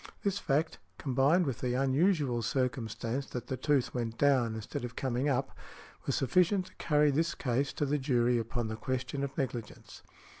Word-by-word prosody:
This 200 Hz, -1 st, 0 dB
fact, 155 Hz, +2 st, 0 dB, 0.2 s
combined 140 Hz, +6 st, +3 dB
with 130 Hz, -4 st, -2 dB
the 125 Hz, -1 st, -1 dB
unusual 135 Hz, -1 st, +2 dB
circumstance 120 Hz, +1 st, -2 dB
that 125 Hz, -, -5 dB
the 130 Hz, -, -3 dB
tooth 140 Hz, -1 st, +1 dB
went 115 Hz, -2 st, -3 dB
down 130 Hz, -6 st, +3 dB
instead 110 Hz, +2 st, -5 dB
of 120 Hz, 0 st, -5 dB
coming 130 Hz, +2 st, 0 dB
up, 135 Hz, 0 st, -1 dB, 0.5 s
was -, -, +1 dB
sufficient 180 Hz, -, +2 dB
to 185 Hz, -, -16 dB
carry 150 Hz, -2 st, +3 dB
the 165 Hz, +4 st, 0 dB
case 135 Hz, +2 st, 0 dB
to 145 Hz, -, -1 dB
the 145 Hz, +1 st, 0 dB
jury 125 Hz, -3 st, +2 dB
upon 115 Hz, +1 st, -2 dB
the 110 Hz, -, -3 dB
question 130 Hz, +4 st, -3 dB
of 140 Hz, 0 st, -4 dB
negligence. 120 Hz, -5 st, -5 dB
130 Hz, 175 wpm, -31 LUFS, 120-145 Hz, 0.5 s, combined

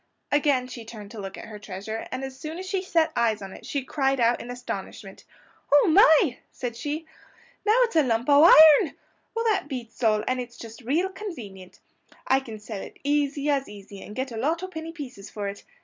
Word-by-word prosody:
Again 285 Hz, -3 st, +2 dB
she 250 Hz, -2 st, -8 dB
turned 215 Hz, -2 st, -10 dB
to 225 Hz, -, -8 dB
look 195 Hz, -1 st, -7 dB
at -, -, -8 dB
her 215 Hz, -1 st, -9 dB
treasure, 205 Hz, +2 st, -6 dB
and 255 Hz, +1 st, -5 dB
as 265 Hz, -1 st, -6 dB
soon 310 Hz, +4 st, -7 dB
as 375 Hz, -, -6 dB
she 385 Hz, 0 st, -1 dB
set 330 Hz, -4 st, +1 dB
eyes 225 Hz, -3 st, +2 dB
on 195 Hz, -1 st, -8 dB
it -, -, -12 dB
she 280 Hz, -2 st, -2 dB
cried 270 Hz, 0 st, 0 dB
out 235 Hz, 0 st, +3 dB
in 245 Hz, -, -9 dB
astonishment. 200 Hz, -5 st, -7 dB, 0.5 s
"Oh, 290 Hz, +4 st, +6 dB
my!" 315 Hz, -, +5 dB
said 245 Hz, -2 st, -5 dB
she; 300 Hz, +6 st, -4 dB, 0.6 s
"now 430 Hz, +3 st, +5 dB
it's 465 Hz, -7 st, -2 dB
a 315 Hz, -, +6 dB
lump 235 Hz, -3 st, 0 dB
o' 285 Hz, +1 st, +7 dB
iron! 315 Hz, -3 st, +8 dB, 0.4 s
Well, 460 Hz, 0 st, -1 dB
that 425 Hz, -10 st, +1 dB
beats 245 Hz, -5 st, -7 dB
all; 215 Hz, -1 st, +3 dB
and 255 Hz, 0 st, 0 dB
it's 240 Hz, -1 st, -10 dB
just 225 Hz, +1 st, -10 dB
real 310 Hz, +10 st, 0 dB
convenient! 235 Hz, -, -9 dB, 0.4 s
I 265 Hz, -, +3 dB
can 230 Hz, -5 st, -9 dB
sell 210 Hz, -1 st, -7 dB
it -, -, -9 dB
as -, -, -24 dB
easy 285 Hz, 0 st, 0 dB
as 275 Hz, -1 st, 0 dB
easy, 200 Hz, -1 st, -11 dB
and 210 Hz, -, -10 dB
get 260 Hz, 0 st, -3 dB
a 230 Hz, -, -6 dB
lot 320 Hz, +9 st, 0 dB
o' -, -, -3 dB
penny 325 Hz, -3 st, -7 dB
pieces 250 Hz, -11 st, -9 dB
for 205 Hz, -1 st, -5 dB
it. 200 Hz, 0 st, -7 dB
255 Hz, 220 wpm, -25 LUFS, 220-305 Hz, 0.6 s, iron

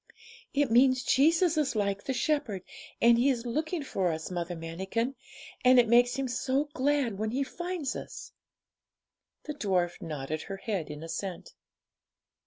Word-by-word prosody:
'It 280 Hz, -3 st, +1 dB
means 255 Hz, +1 st, +5 dB
Jesus 325 Hz, +6 st, +3 dB
is 290 Hz, -5 st, +1 dB
like 200 Hz, -1 st, -1 dB
the -, -, -2 dB
shepherd, 250 Hz, -7 st, -1 dB, 0.4 s
and 235 Hz, 0 st, +5 dB
He 265 Hz, +3 st, +4 dB
is 245 Hz, -3 st, -1 dB
looking 310 Hz, +6 st, -2 dB
for 190 Hz, -9 st, 0 dB
us, 160 Hz, +2 st, -5 dB
Mother 175 Hz, 0 st, -3 dB
Manikin; 190 Hz, +10 st, -3 dB, 0.5 s
and 255 Hz, 0 st, +6 dB
it 240 Hz, -, +4 dB
makes 245 Hz, +2 st, +4 dB
Him 270 Hz, -1 st, -1 dB
so 265 Hz, +4 st, -1 dB
glad 265 Hz, -6 st, 0 dB
when 220 Hz, 0 st, -1 dB
He 265 Hz, +5 st, 0 dB
finds 345 Hz, -1 st, -4 dB
us.' -, -, -8 dB, 1.1 s
The 300 Hz, -, -5 dB
dwarf 185 Hz, -10 st, -1 dB
nodded 155 Hz, 0 st, -4 dB
her 195 Hz, -, -6 dB
head 195 Hz, -6 st, -3 dB
in 150 Hz, +1 st, -7 dB
assent. 165 Hz, +2 st, -5 dB
240 Hz, 155 wpm, -29 LUFS, 190-275 Hz, 1.1 s, and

